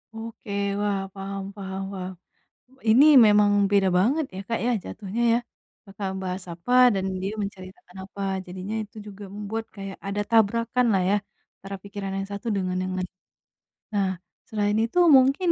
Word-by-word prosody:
Oke, 225 -2 -8 0.3
wah, 205 -1 0
paham 195 0 -5
paham 190 -1 -5
paham. 185 0 -5 0.8
Ini 260 +7 +7 0.2
memang 210 -1 +5 0.2
beda 195 -2 +4
banget, 270 - +2
ya 190 - -4
Kak, 230 - -1
ya, 245 - +2
jatuhnya 215 +3 -4
ya. 235 - +3 0.5
Kakak 195 0 -5
membahas 190 -1 -4
apa, 180 +9 -3 0.2
dan 190 -1 -1 0.2
dia 195 +3 -2
menceritakan 185 -2 -8
apa, 200 0 -9 0.2
jadinya 185 +4 -6
itu 205 - -31
juga 205 0 -10
membuat 215 +2 -4
kayak 195 -1 -7
ada 205 +1 -1
tabrakanlah 230 -1 +3
ya, 205 - +4 0.4
antara 195 +1 -7
pikiran 200 -1 -6
yang 195 0 -3
satu 200 +3 -6
dengan 185 -2 -1
yang 185 - -3
lain. 185 -1 -3 0.8
Nah, 200 -2 +1 0.4
selain 210 -1 0
itu, 230 +10 0 0.2
mungkin 275 +7 +3
200 Hz, 155 wpm, -25 LUFS, 190-220 Hz, 0.8 s, Ini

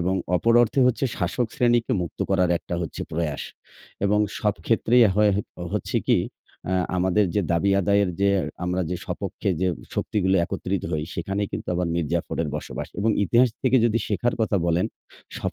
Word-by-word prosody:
এবং 90 +2 +1 0.2
অপর 115 +5 +2
অর্থে 120 +4 +1
হচ্ছে 125 +1 +1
শাসক 125 -2 -1
শ্রেণীকে 120 0 +2
মুক্ত 85 - -7
করার 90 -2 +3
একটা 85 - -6
হচ্ছে 85 - -5
প্রয়াস 80 -3 -2 0.6
এবং 105 +1 +3 0.2
সব 105 -1 +1
ক্ষেত্রেই 120 +1 +4
হয় 105 0 +4
হ 100 - +1 0.3
হচ্ছে - - -1
কি - - +5 0.5
আ - - 0 0.2
আমাদের 95 +3 +2
যে 105 - +3
দাবি 85 +4 +2
আদায়ের 100 0 +2
যে 100 - +4 0.4
আমরা 90 +1 -1
যে 90 - -1
স্বপক্ষে 95 +3 -4
যে 95 - +2 0.3
শক্তিগুলো 95 -2 +1
একত্রিত 95 +2 -3
হই। 75 -1 -1
সেখানেই 100 +4 -2
কিন্তু - - -5
আবার 90 0 0
মীরজাফরের 80 0 -1
বসবাস - - -6
এবং 110 +3 +2
ইতিহাস 120 +6 +4
থেকে 130 0 +4
যদি 115 -1 +2
শেখার 105 +4 0
কথা 110 -2 +1
বলেন 85 +1 +2 0.5
সব - - -3
100 Hz, 170 wpm, -24 LUFS, 90-110 Hz, 0.6 s, কি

